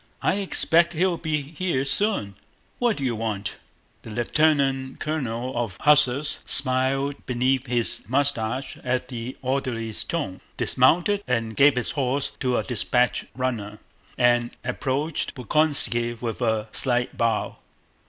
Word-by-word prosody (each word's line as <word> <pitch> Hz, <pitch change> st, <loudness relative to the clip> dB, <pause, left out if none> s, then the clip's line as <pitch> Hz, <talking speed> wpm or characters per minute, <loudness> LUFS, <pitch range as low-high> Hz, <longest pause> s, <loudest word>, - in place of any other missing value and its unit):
I 190 Hz, -, +2 dB
expect 170 Hz, -3 st, +2 dB
he'll 175 Hz, +1 st, 0 dB
be 150 Hz, -3 st, -2 dB
here 150 Hz, -2 st, -2 dB
soon. 170 Hz, -, +1 dB, 0.5 s
What 240 Hz, -3 st, +1 dB
do 140 Hz, -, -4 dB
you 125 Hz, -3 st, -1 dB
want?" 105 Hz, -3 st, -4 dB, 0.4 s
The -, -, -11 dB
lieutenant 135 Hz, +2 st, 0 dB
colonel 130 Hz, -5 st, -3 dB
of 115 Hz, -6 st, -3 dB
hussars 150 Hz, -1 st, +3 dB
smiled 135 Hz, +2 st, +1 dB
beneath 130 Hz, +1 st, 0 dB
his 120 Hz, -1 st, 0 dB
mustache 130 Hz, -2 st, 0 dB
at 125 Hz, 0 st, -2 dB
the 120 Hz, 0 st, -6 dB
orderly's 125 Hz, -4 st, -2 dB
tone, 145 Hz, -, -4 dB, 0.2 s
dismounted, 200 Hz, +5 st, +2 dB, 0.3 s
gave 140 Hz, 0 st, +5 dB
his 125 Hz, -, -1 dB
horse 135 Hz, 0 st, -1 dB
to 125 Hz, -2 st, 0 dB
a -, -, 0 dB
dispatch 125 Hz, 0 st, +1 dB
runner, 115 Hz, -5 st, -3 dB, 0.4 s
and 120 Hz, -1 st, +3 dB
approached 140 Hz, +4 st, -2 dB
Bolkónski 120 Hz, -3 st, +3 dB
with 115 Hz, 0 st, -5 dB
a 110 Hz, -2 st, 0 dB
slight 125 Hz, -2 st, +2 dB
bow. 115 Hz, -2 st, -1 dB
130 Hz, 125 wpm, -24 LUFS, 120-145 Hz, 0.5 s, gave